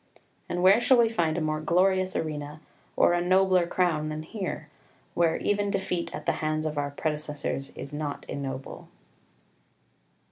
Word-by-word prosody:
And 175 Hz, 0 st, -1 dB
where 195 Hz, +5 st, +7 dB
shall 260 Hz, +1 st, +5 dB
we 235 Hz, -1 st, +5 dB
find 170 Hz, -7 st, 0 dB
a -, -, 0 dB
more 155 Hz, 0 st, -1 dB
glorious 185 Hz, +3 st, +2 dB
arena 150 Hz, -1 st, -4 dB, 0.4 s
or -, -, +4 dB
a 175 Hz, -, +2 dB
nobler 185 Hz, 0 st, +3 dB
crown 165 Hz, -4 st, +1 dB
than 155 Hz, 0 st, -4 dB
here, 185 Hz, -4 st, -5 dB, 0.5 s
where 170 Hz, -1 st, +2 dB
even 205 Hz, 0 st, 0 dB
defeat 180 Hz, -3 st, -2 dB
at -, -, -7 dB
the -, -, +3 dB
hands 155 Hz, 0 st, -1 dB
of 155 Hz, -1 st, -2 dB
our 145 Hz, -1 st, -1 dB
predecessors 150 Hz, -2 st, -3 dB
is 140 Hz, -, -7 dB
not 145 Hz, -1 st, -4 dB
ignoble? 135 Hz, -1 st, -6 dB
160 Hz, 155 wpm, -27 LUFS, 150-185 Hz, 0.5 s, where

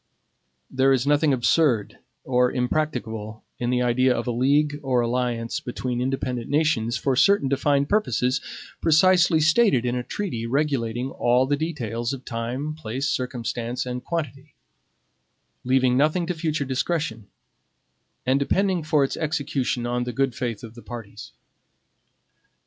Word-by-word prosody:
There 135 Hz, +1 st, +3 dB
is 130 Hz, -1 st, +2 dB
nothing 145 Hz, +1 st, +3 dB
absurd 130 Hz, -3 st, +2 dB, 0.2 s
or 125 Hz, -1 st, +2 dB
impracticable 120 Hz, -5 st, -2 dB, 0.2 s
in 120 Hz, -, -1 dB
the 125 Hz, 0 st, +1 dB
idea 125 Hz, +1 st, +3 dB
of -, -, -3 dB
a 125 Hz, -, -1 dB
league 145 Hz, +4 st, +2 dB
or 130 Hz, -3 st, +1 dB
alliance 120 Hz, -1 st, -1 dB
between 125 Hz, 0 st, -4 dB
independent 125 Hz, -2 st, -2 dB
nations 145 Hz, -7 st, +1 dB
for 135 Hz, -2 st, 0 dB
certain 200 Hz, +1 st, +4 dB
defined 140 Hz, +1 st, +1 dB
purposes 130 Hz, -, +1 dB, 0.4 s
precisely 175 Hz, +1 st, +4 dB
stated 155 Hz, -, +3 dB
in 120 Hz, 0 st, 0 dB
a 125 Hz, -, -1 dB
treaty 120 Hz, -, -4 dB
regulating 130 Hz, -2 st, -1 dB
all 125 Hz, +2 st, +2 dB
the 145 Hz, +2 st, +1 dB
details 125 Hz, -6 st, -3 dB
of 130 Hz, -1 st, -8 dB
time, 125 Hz, +6 st, -3 dB
place, 140 Hz, -2 st, -4 dB
circumstance, 125 Hz, -1 st, -3 dB
and 125 Hz, 0 st, -5 dB
quantity; 150 Hz, -4 st, -5 dB, 1.1 s
leaving 130 Hz, 0 st, +2 dB
nothing 155 Hz, +5 st, +2 dB
to 180 Hz, -, -2 dB
future 155 Hz, -3 st, -2 dB
discretion; 130 Hz, -, -2 dB, 1.0 s
and 130 Hz, +2 st, +2 dB
depending 185 Hz, +5 st, +1 dB
for 155 Hz, -2 st, +2 dB
its 135 Hz, -, -1 dB
execution 145 Hz, -6 st, -1 dB
on 120 Hz, 0 st, -1 dB
the 125 Hz, -, -4 dB
good 135 Hz, +1 st, 0 dB
faith 115 Hz, -2 st, -4 dB
of 115 Hz, -1 st, -9 dB
the 120 Hz, -, -12 dB
parties. 115 Hz, -4 st, -9 dB
130 Hz, 140 wpm, -24 LUFS, 120-150 Hz, 1.1 s, certain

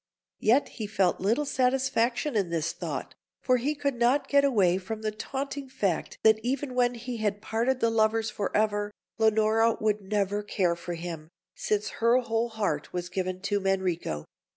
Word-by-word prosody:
Yet 250 Hz, +6 st, +3 dB
he 215 Hz, -4 st, -6 dB
felt 195 Hz, -4 st, +1 dB
little 230 Hz, +10 st, +1 dB
satisfaction 255 Hz, 0 st, +1 dB
in 195 Hz, -5 st, +1 dB
this 165 Hz, -1 st, -1 dB
thought, -, -, -5 dB, 0.3 s
for 255 Hz, -1 st, +3 dB
he 285 Hz, +5 st, -1 dB
could 280 Hz, -1 st, -1 dB
not 245 Hz, +4 st, +2 dB
get 280 Hz, 0 st, +4 dB
away 195 Hz, -10 st, +3 dB
from 220 Hz, +3 st, -6 dB
the 215 Hz, -, 0 dB
taunting 275 Hz, +5 st, -5 dB
fact 200 Hz, -10 st, -2 dB
that 220 Hz, 0 st, +6 dB
even 255 Hz, +3 st, -2 dB
when 245 Hz, -1 st, +2 dB
he 240 Hz, +1 st, -5 dB
had 210 Hz, -2 st, -1 dB
parted 235 Hz, +5 st, -1 dB
the 230 Hz, -, +3 dB
lovers 220 Hz, 0 st, +2 dB
for 205 Hz, -2 st, -2 dB
ever, 205 Hz, -1 st, +1 dB, 0.3 s
Leonora 220 Hz, +1 st, +3 dB
would 215 Hz, -1 st, +1 dB
never 205 Hz, 0 st, -1 dB
care 185 Hz, -4 st, 0 dB
for 170 Hz, 0 st, -6 dB
him, 165 Hz, -2 st, -7 dB, 0.2 s
since 210 Hz, -1 st, -1 dB
her 235 Hz, +2 st, +5 dB
whole 235 Hz, -1 st, 0 dB
heart 200 Hz, -10 st, -2 dB
was 175 Hz, 0 st, -4 dB
given 185 Hz, 0 st, -3 dB
to 205 Hz, +1 st, 0 dB
Manrico. 185 Hz, -, -1 dB
220 Hz, 175 wpm, -28 LUFS, 195-245 Hz, 0.3 s, that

